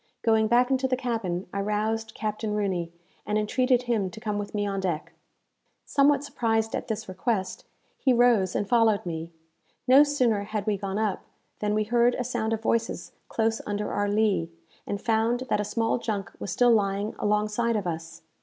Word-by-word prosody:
Going 220 Hz, -1 st, +3 dB
back 245 Hz, +3 st, +3 dB
into 265 Hz, 0 st, +2 dB
the 255 Hz, -1 st, 0 dB
cabin, 220 Hz, -8 st, -2 dB
I 200 Hz, -, -1 dB
roused 220 Hz, +2 st, -1 dB
Captain 215 Hz, 0 st, -3 dB
Rooney, 185 Hz, -5 st, -1 dB, 0.3 s
and 210 Hz, 0 st, -1 dB
entreated 250 Hz, +4 st, +2 dB
him 225 Hz, -6 st, 0 dB
to 220 Hz, -, -10 dB
come 210 Hz, -2 st, -2 dB
with 205 Hz, +1 st, -6 dB
me 205 Hz, 0 st, 0 dB
on 195 Hz, -1 st, -2 dB
deck. 175 Hz, -5 st, -3 dB, 0.7 s
Somewhat 280 Hz, 0 st, +3 dB
surprised 225 Hz, -5 st, 0 dB
at -, -, -4 dB
this 220 Hz, -1 st, -3 dB
request, 190 Hz, 0 st, -2 dB, 0.3 s
he 265 Hz, -, +3 dB
rose 235 Hz, -6 st, +3 dB
and 205 Hz, -, 0 dB
followed 225 Hz, -3 st, +3 dB
me. 165 Hz, -1 st, -5 dB, 0.6 s
No 265 Hz, +3 st, +8 dB
sooner 255 Hz, -8 st, +1 dB
had 210 Hz, -1 st, -3 dB
we 215 Hz, -2 st, +1 dB
gone 195 Hz, 0 st, -4 dB
up, 215 Hz, -3 st, -1 dB, 0.3 s
than 210 Hz, 0 st, 0 dB
we 215 Hz, -, +2 dB
heard 240 Hz, +2 st, +3 dB
a 250 Hz, -, -2 dB
sound 235 Hz, -2 st, -2 dB
of 225 Hz, 0 st, -2 dB
voices 230 Hz, 0 st, -1 dB, 0.2 s
close 225 Hz, 0 st, 0 dB
under 205 Hz, 0 st, -2 dB
our 205 Hz, 0 st, 0 dB
lee, 205 Hz, -5 st, +1 dB, 0.4 s
and 205 Hz, -, -2 dB
found 230 Hz, +2 st, +1 dB
that -, -, +2 dB
a -, -, -1 dB
small 225 Hz, +3 st, 0 dB
junk 210 Hz, -4 st, -3 dB
was -, -, -5 dB
still 245 Hz, +6 st, +4 dB
lying 205 Hz, -1 st, +1 dB
alongside 210 Hz, +3 st, +1 dB
of 205 Hz, -3 st, -1 dB
us. 165 Hz, -1 st, -5 dB
215 Hz, 185 wpm, -26 LUFS, 200-235 Hz, 0.7 s, No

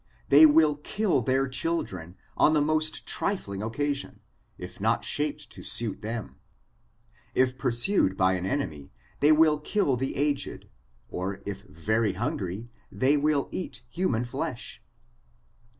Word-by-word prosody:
They 150 Hz, +3 st, +9 dB
will 150 Hz, -1 st, +4 dB
kill 200 Hz, +6 st, 0 dB
their 135 Hz, 0 st, +1 dB
children 100 Hz, -, -3 dB, 0.2 s
on 155 Hz, -, +4 dB
the 155 Hz, -, +4 dB
most 155 Hz, +1 st, 0 dB
trifling 100 Hz, -, -2 dB
occasion, 135 Hz, 0 st, -3 dB, 0.4 s
if 90 Hz, +1 st, -9 dB
not 110 Hz, +2 st, +1 dB
shaped 150 Hz, 0 st, -1 dB
to -, -, -9 dB
suit 115 Hz, -4 st, -1 dB
them. 115 Hz, +1 st, -5 dB, 1.0 s
If 130 Hz, 0 st, +3 dB
pur 130 Hz, 0 st, -1 dB
sued 115 Hz, -, +2 dB
by 95 Hz, 0 st, +3 dB
an 90 Hz, 0 st, -2 dB
enemy, 80 Hz, -, -3 dB, 0.3 s
they 145 Hz, +2 st, +5 dB
will 155 Hz, -1 st, +5 dB
kill 150 Hz, -4 st, +1 dB
the 135 Hz, +2 st, -2 dB
aged: 145 Hz, 0 st, -1 dB, 0.5 s
or 95 Hz, +2 st, -4 dB
if 100 Hz, -1 st, -5 dB
very 105 Hz, +5 st, 0 dB
hungry, 100 Hz, +5 st, -4 dB, 0.2 s
they 135 Hz, +3 st, +2 dB
will 145 Hz, -1 st, +1 dB
eat 185 Hz, -, -5 dB
human 125 Hz, -10 st, 0 dB
flesh. 120 Hz, -, -5 dB
130 Hz, 135 wpm, -27 LUFS, 100-150 Hz, 1.0 s, They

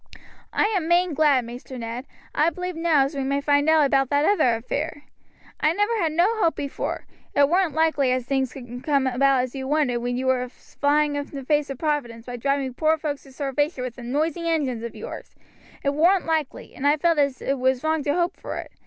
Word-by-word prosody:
"I -, -, +2 dB
am 340 Hz, -4 st, 0 dB
main 350 Hz, 0 st, +3 dB
glad, 285 Hz, -5 st, +3 dB
Maister 245 Hz, +2 st, -8 dB
Ned. 235 Hz, +3 st, -6 dB, 0.3 s
I 305 Hz, +3 st, +3 dB
b'lieve 360 Hz, +1 st, -5 dB
now 325 Hz, -4 st, +3 dB
as 275 Hz, -, -4 dB
we 275 Hz, -1 st, -2 dB
may 275 Hz, +1 st, 0 dB
find 285 Hz, +1 st, +2 dB
out 315 Hz, -2 st, +5 dB
about 270 Hz, -1 st, +2 dB
that 290 Hz, +1 st, +2 dB
other 310 Hz, -, +3 dB
affair. 290 Hz, +6 st, -4 dB, 0.6 s
I 305 Hz, +1 st, +3 dB
never 415 Hz, +5 st, +1 dB
had 330 Hz, -4 st, +1 dB
no 390 Hz, +8 st, +2 dB
hope 330 Hz, -, +2 dB
before, 280 Hz, -1 st, -4 dB, 0.3 s
it 285 Hz, 0 st, +5 dB
warn't 350 Hz, 0 st, +1 dB
likely 315 Hz, -5 st, +2 dB
as 255 Hz, -1 st, 0 dB
things 265 Hz, -1 st, -1 dB
would 245 Hz, -1 st, -8 dB
come 280 Hz, -2 st, +2 dB
about 260 Hz, 0 st, +3 dB
as 255 Hz, -, -5 dB
you 265 Hz, -1 st, -5 dB
wanted, 285 Hz, -4 st, +1 dB
when 245 Hz, +1 st, -2 dB
you 260 Hz, -, -2 dB
was 255 Hz, -1 st, +2 dB
a -, -, -11 dB, 0.3 s
flying 290 Hz, 0 st, +2 dB
in 285 Hz, 0 st, -3 dB
the 275 Hz, -3 st, -8 dB
face 295 Hz, 0 st, +1 dB
of 275 Hz, -, -5 dB
providence 255 Hz, -7 st, -2 dB
by 245 Hz, -1 st, -6 dB
driving 275 Hz, +1 st, -1 dB
poor 315 Hz, +4 st, +2 dB
folks 295 Hz, -2 st, -4 dB
to 270 Hz, -, -15 dB
starvation 280 Hz, +1 st, -1 dB
with 250 Hz, -2 st, -5 dB
them 245 Hz, -1 st, -7 dB
noisy 325 Hz, +4 st, 0 dB
engines 275 Hz, -8 st, 0 dB
of 235 Hz, 0 st, -6 dB
yours; -, -, -8 dB, 0.5 s
it 280 Hz, -, +1 dB
warn't 350 Hz, +5 st, +3 dB
likely, 320 Hz, -4 st, -2 dB
and 280 Hz, -, -1 dB
I 295 Hz, +1 st, +4 dB
felt 335 Hz, 0 st, +2 dB
as 280 Hz, -3 st, +1 dB
it 275 Hz, -1 st, -2 dB
was 260 Hz, +1 st, +1 dB
wrong 315 Hz, 0 st, +1 dB
to 290 Hz, +1 st, +1 dB
hope 350 Hz, +1 st, 0 dB
for -, -, -6 dB
it. -, -, -7 dB
285 Hz, 225 wpm, -24 LUFS, 260-315 Hz, 0.6 s, out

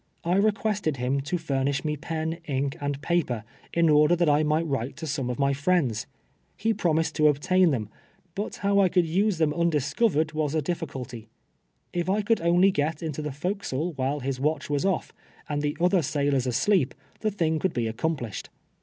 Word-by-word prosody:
I 180 Hz, +3 st, +2 dB
recpiested 205 Hz, -6 st, +1 dB
him 130 Hz, +3 st, 0 dB
to 150 Hz, +6 st, -2 dB
furnish 140 Hz, -3 st, -1 dB
me 150 Hz, 0 st, 0 dB
pen, 160 Hz, +2 st, -3 dB
ink 140 Hz, -1 st, -1 dB
and 145 Hz, -1 st, -2 dB
paper, 145 Hz, -10 st, 0 dB, 0.3 s
in 170 Hz, -1 st, +3 dB
order 150 Hz, +2 st, +5 dB
that 175 Hz, -1 st, +1 dB
I 150 Hz, 0 st, +4 dB
miglit 155 Hz, +2 st, +2 dB
v\ 160 Hz, -, -5 dB
rite 130 Hz, 0 st, -2 dB
to 160 Hz, -, -5 dB
some 135 Hz, -4 st, -2 dB
of 125 Hz, -, -3 dB
my 140 Hz, 0 st, +2 dB
friends. 140 Hz, -6 st, +1 dB, 0.5 s
He 225 Hz, +2 st, +1 dB
promised 160 Hz, -5 st, +1 dB
to 155 Hz, -1 st, +5 dB
obtain 180 Hz, +5 st, +3 dB
them 115 Hz, -8 st, -1 dB, 0.2 s
— 180 Hz, -, -37 dB
but 205 Hz, +4 st, -4 dB
how 200 Hz, 0 st, +4 dB
I 190 Hz, -2 st, +5 dB
could 180 Hz, -1 st, +3 dB
use 190 Hz, +4 st, +1 dB
them 155 Hz, -2 st, +2 dB
undiscover 165 Hz, -, +1 dB
ed 160 Hz, -1 st, -3 dB
was 155 Hz, -1 st, -1 dB
a 155 Hz, -, +2 dB
dithcnlty. 135 Hz, -8 st, -5 dB, 0.7 s
If 175 Hz, 0 st, -1 dB
I 205 Hz, +2 st, +1 dB
could 225 Hz, -1 st, +2 dB
only 175 Hz, +3 st, +4 dB
get 155 Hz, -1 st, -1 dB
into 155 Hz, -2 st, -3 dB
the 150 Hz, -1 st, -3 dB
fore 180 Hz, +9 st, -2 dB
castle 165 Hz, -2 st, -3 dB
while 140 Hz, +1 st, -1 dB
his 130 Hz, 0 st, -3 dB
watch 150 Hz, +2 st, -1 dB
was 145 Hz, +4 st, 0 dB
off, 190 Hz, -3 st, -1 dB, 0.3 s
and 145 Hz, -1 st, -1 dB
the 150 Hz, +1 st, -2 dB
other 180 Hz, +1 st, +3 dB
sailors 140 Hz, -3 st, 0 dB
asleep, 140 Hz, -, +2 dB, 0.2 s
the 215 Hz, -, 0 dB
thing 165 Hz, -6 st, 0 dB
could 190 Hz, -, 0 dB
be 120 Hz, -2 st, 0 dB
accomplished. 120 Hz, -1 st, -3 dB
155 Hz, 200 wpm, -26 LUFS, 140-175 Hz, 0.7 s, order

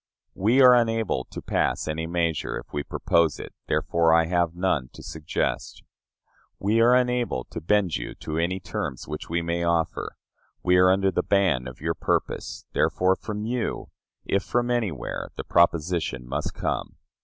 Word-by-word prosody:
We 120 Hz, +8 st, +4 dB
are 125 Hz, -1 st, +9 dB
unable 115 Hz, -, +1 dB
to -, -, -9 dB
pass -, -, 0 dB
any 80 Hz, +1 st, -2 dB
measure, 85 Hz, -2 st, -1 dB
if -, -, -11 dB
we 75 Hz, -, -1 dB
propose 85 Hz, 0 st, +1 dB
it; -, -, -8 dB
therefore 80 Hz, +1 st, +2 dB
I 85 Hz, 0 st, +4 dB
have 85 Hz, 0 st, 0 dB
none 85 Hz, -8 st, 0 dB
to -, -, -11 dB
suggest. 80 Hz, -1 st, -3 dB, 0.7 s
We 110 Hz, +4 st, +2 dB
are 120 Hz, +2 st, +6 dB
unable 125 Hz, -, +1 dB
to 85 Hz, -, -5 dB
bend 95 Hz, -1 st, +2 dB
you -, -, -6 dB
to 80 Hz, +1 st, -4 dB
any 90 Hz, +3 st, 0 dB
terms 75 Hz, -7 st, -5 dB
which 75 Hz, 0 st, -6 dB
we 85 Hz, +1 st, 0 dB
may 85 Hz, +1 st, -1 dB
offer; 85 Hz, -1 st, 0 dB, 0.5 s
we 90 Hz, 0 st, +4 dB
are 90 Hz, 0 st, +6 dB
under 95 Hz, +1 st, +3 dB
the -, -, +1 dB
ban 90 Hz, -11 st, +2 dB
of 65 Hz, -1 st, -10 dB
your -, -, 0 dB
purpose: -, -, -2 dB
therefore 95 Hz, +1 st, +2 dB
from 105 Hz, +1 st, -5 dB
you, 120 Hz, 0 st, -3 dB, 0.3 s
if 100 Hz, -, +1 dB
from 120 Hz, +3 st, 0 dB
anywhere, 105 Hz, -, -2 dB
the -, -, -5 dB
proposition 85 Hz, -6 st, +1 dB
must -, -, -3 dB
come. -, -, -3 dB
85 Hz, 165 wpm, -25 LUFS, 80-105 Hz, 0.7 s, are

